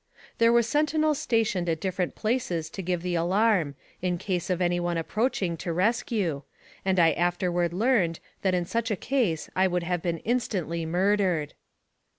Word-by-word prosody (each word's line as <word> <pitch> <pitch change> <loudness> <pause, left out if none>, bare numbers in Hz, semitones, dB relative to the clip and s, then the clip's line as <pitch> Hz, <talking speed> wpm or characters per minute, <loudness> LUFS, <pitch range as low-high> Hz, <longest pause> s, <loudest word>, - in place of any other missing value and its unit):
There 230 0 +5
were 235 0 +5
sentinels 305 +3 +1
stationed 215 -7 0
at 160 -1 0
different 185 0 -2
places 185 -9 -1
to 195 - -5
give 180 -1 -2
the 180 -1 -2
alarm, 175 -2 +2 0.3
in 180 -1 0
case 180 0 -2
of 180 -1 0
any 175 -1 +1
one 175 -1 -1
approaching 190 0 -1
to 170 - -4
rescue, 190 - 0 0.4
and 190 -1 +1
I 165 -1 +6
afterward 175 0 0
learned 190 -4 +1 0.2
that 190 -2 +2
in 175 -1 0
such 230 +5 -1
a 210 - +1
case 220 - 0
I 190 +1 +4
would 180 -1 -1
have 175 0 -1
been 170 -1 -1
instantly 175 -7 -2
murdered. 180 -3 +1
180 Hz, 165 wpm, -27 LUFS, 170-220 Hz, 0.4 s, I